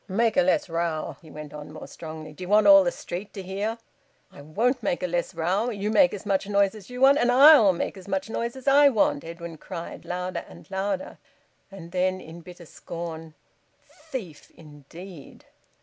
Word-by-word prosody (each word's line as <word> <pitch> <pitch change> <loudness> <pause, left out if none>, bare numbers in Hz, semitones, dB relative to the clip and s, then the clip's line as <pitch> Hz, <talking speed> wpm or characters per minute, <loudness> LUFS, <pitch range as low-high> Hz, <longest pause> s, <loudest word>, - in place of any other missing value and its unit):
"Make 225 +3 +1
a 275 - +5
less 280 0 +2
row!" 165 -2 -3
he 160 - -15
went 150 -1 -10
on 150 0 -9
more 155 - -9
strongly. 155 -1 -9
"D'ye 180 +4 -8
want 210 +2 +4
all 195 -1 +9
th' 175 - 0
street 180 +4 -7
to 195 - -7
hear 200 +5 -3 0.5
ye?" - - -15
"I - - -9
won't 225 - 0
make 265 -8 -2
a - - +2
less 175 +1 -2
row. 185 +8 0
You 210 -2 -3
make 270 +3 +5
as 205 0 -7
much 195 -1 0
noise 200 -1 +2
as 210 -4 -12
you 250 +1 -7
want, 275 +2 +6
and 245 -3 +3
I'll 265 -5 +8
make 175 - -3
as 190 - -12
much 195 0 -2
noise 235 +2 -3
as 265 +1 -11
I 285 +1 +7
want!" 210 - +1
Edwin 170 -1 -8
cried 170 -3 -8
louder 180 +1 -4
and - - -14
louder. 190 0 -3 0.5
And 185 -4 -11
then 185 +1 0
in 170 0 -11
bitter 175 +1 -13
scorn, 165 -1 -8 0.7
"Thief, 195 - -7
indeed!" 155 +2 -13
185 Hz, 195 wpm, -25 LUFS, 165-215 Hz, 0.7 s, all